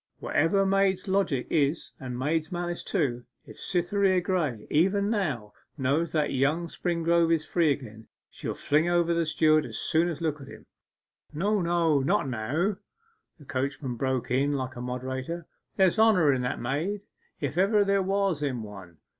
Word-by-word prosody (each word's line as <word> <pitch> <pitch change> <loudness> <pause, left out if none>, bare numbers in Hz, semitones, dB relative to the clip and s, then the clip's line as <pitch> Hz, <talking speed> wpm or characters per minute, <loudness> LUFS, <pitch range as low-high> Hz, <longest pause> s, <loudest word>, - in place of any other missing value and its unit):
'Whatever 180 +6 +1
maids' 195 -1 +1
logic 190 -10 +1
is 150 +1 +1
and 125 -2 -5
maids' 155 +4 -1
malice 175 0 -3
too, 130 -10 -1 0.2
if - - -13
Cytherea 185 +1 +1
Graye 170 - -1
even 195 +6 +2
now 140 - -2 0.2
knows 145 +5 0
that 155 -2 0
young 150 +6 +1
Springrove 170 -1 +1
is 160 -2 +1
free 165 -4 +2
again, 110 -5 -6 0.2
she'll - - -6
fling 155 +4 +1
over 170 -1 +2
the 170 0 +1
steward 155 0 +3
as - - -6
soon 165 +2 +1
as 160 -4 -5
look 155 -3 -2
at 135 - -10
him.' - - -12 0.7
'No, 200 +6 +1
no: 170 -3 +2
not 150 +3 +1
now,' 145 - -1 0.6
the 150 - -16
coachman 135 0 -3
broke 130 0 -2
in 140 +3 +2
like 130 -1 -3
a 120 - -6
moderator. 130 +6 -4 0.3
'There's 190 +2 +3
honour 185 -10 +5
in 130 - -1
that 125 - -2
maid, 155 - -2 0.4
if 145 -1 -3
ever 200 +3 +3
there 200 0 +2
was 195 -4 0
in 130 -6 -2
one. 95 -5 -11
160 Hz, 165 wpm, -27 LUFS, 135-180 Hz, 0.7 s, honour